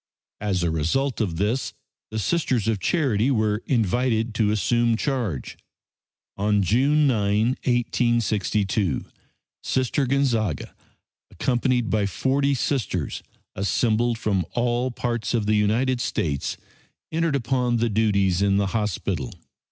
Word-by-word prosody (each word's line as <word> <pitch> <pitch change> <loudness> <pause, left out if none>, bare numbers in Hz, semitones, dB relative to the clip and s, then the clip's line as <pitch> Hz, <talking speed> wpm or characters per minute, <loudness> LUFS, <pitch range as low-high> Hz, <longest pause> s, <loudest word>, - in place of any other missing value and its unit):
As 100 -4 -1
a 85 - +1
result 115 - 0
of 90 -6 -1
this 105 +2 -1 0.4
the 110 - -5
Sisters 125 - 0
of 110 -3 +1
Charity 125 - +1
were 110 -4 +1
invited 115 0 +1
to 110 -2 +1
assume 115 +3 +2
charge. 115 - -3 0.8
On 105 0 +2
June 140 - +3
9, 105 -3 +2 0.2
1862, 110 - 0 0.6
Sister 130 +1 0
Gonzaga, 120 - 0 0.6
accompanied 125 -2 0
by 105 -2 +1
40 140 +7 +1
Sisters, 120 - -2 0.3
assembled 115 +4 +1
from 100 -5 0
all 120 +1 0
parts 120 -1 -2
of 110 -3 0
the 105 - +2
United 120 +5 +1
States, 75 - -2 0.5
entered 165 -2 0
upon 125 -1 0
the 115 +1 +1
duties 100 -4 +2
in 100 -1 +3
the 100 -1 +1
hospital. 100 - -2
115 Hz, 120 wpm, -24 LUFS, 100-125 Hz, 0.8 s, June